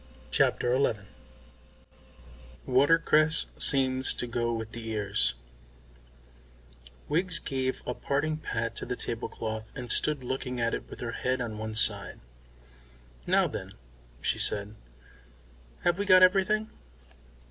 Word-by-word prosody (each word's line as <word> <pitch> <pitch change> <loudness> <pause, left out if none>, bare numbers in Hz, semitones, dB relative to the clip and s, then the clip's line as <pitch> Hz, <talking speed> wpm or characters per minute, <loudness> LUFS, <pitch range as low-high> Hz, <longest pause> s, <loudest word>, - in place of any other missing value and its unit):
CHAPTER 120 +1 +1
XI 125 -6 0 1.6
WATERCRESS 155 +3 +4
SEEMS 130 -1 +5
TO - - -3
GO 120 0 -2
WITH 110 -1 -5
THE 115 -1 -6
EARS 100 -11 0 1.7
Wiggs 175 +3 +1
gave 130 -1 -3
a 125 - -3
parting 145 +5 -2
pat 115 -6 -4
to - - -4
the 125 - -3
tablecloth 110 -2 -6
and 125 -4 -5
stood 150 -4 +1
looking 125 0 -4
at 115 0 0
it - - -5
with - - -10
her 120 - -4
head 130 +2 -2
on 110 -3 -5
one 110 0 -5
side. 110 - +1 1.1
"Now, - - +3
then," - - -7 0.5
she - - 0
said, 105 0 +2 1.1
"have 175 +2 +1
we 205 - -1
got 185 -1 +7
everything?" 195 +4 +2
125 Hz, 125 wpm, -28 LUFS, 115-155 Hz, 1.7 s, got